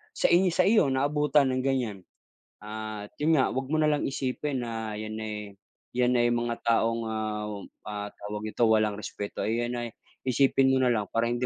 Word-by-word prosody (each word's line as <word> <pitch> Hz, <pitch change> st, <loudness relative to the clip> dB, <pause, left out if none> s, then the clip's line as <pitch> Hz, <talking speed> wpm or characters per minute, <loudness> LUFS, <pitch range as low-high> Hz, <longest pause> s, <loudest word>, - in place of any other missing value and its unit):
sa -, -, +3 dB
i 180 Hz, +2 st, +5 dB
sa 185 Hz, -, +4 dB
iyo 210 Hz, -7 st, +5 dB
naabutan 145 Hz, 0 st, +3 dB
ng 130 Hz, 0 st, 0 dB
ganyan. 125 Hz, -7 st, 0 dB, 0.6 s
At 105 Hz, -1 st, -6 dB
yun 160 Hz, +1 st, +4 dB
nga, -, -, +3 dB
wag 130 Hz, +1 st, -2 dB
mo -, -, +2 dB
nalang 150 Hz, -1 st, +2 dB
isipin 135 Hz, 0 st, -2 dB
na 110 Hz, -2 st, -4 dB
yan 110 Hz, 0 st, -5 dB
eh, 105 Hz, -2 st, -6 dB, 0.4 s
yan 125 Hz, 0 st, +3 dB
ay 120 Hz, 0 st, +4 dB
mga 120 Hz, 0 st, -1 dB
taong, 115 Hz, 0 st, +2 dB
ah, 110 Hz, -1 st, -2 dB, 0.4 s
ah, 105 Hz, -1 st, -4 dB
tawag 105 Hz, +1 st, -6 dB
nito 115 Hz, -, -1 dB
walang 110 Hz, -2 st, +3 dB
respeto 100 Hz, 0 st, -5 dB
ay 115 Hz, +2 st, 0 dB
yan 120 Hz, -, -3 dB
ay 120 Hz, -1 st, -4 dB, 0.4 s
isipin 135 Hz, +1 st, +4 dB
mo 130 Hz, -, +3 dB
na 125 Hz, -, +4 dB
lang 105 Hz, -2 st, 0 dB
para 115 Hz, +1 st, +2 dB
hindi 120 Hz, +1 st, -1 dB
120 Hz, 190 wpm, -28 LUFS, 110-135 Hz, 0.6 s, i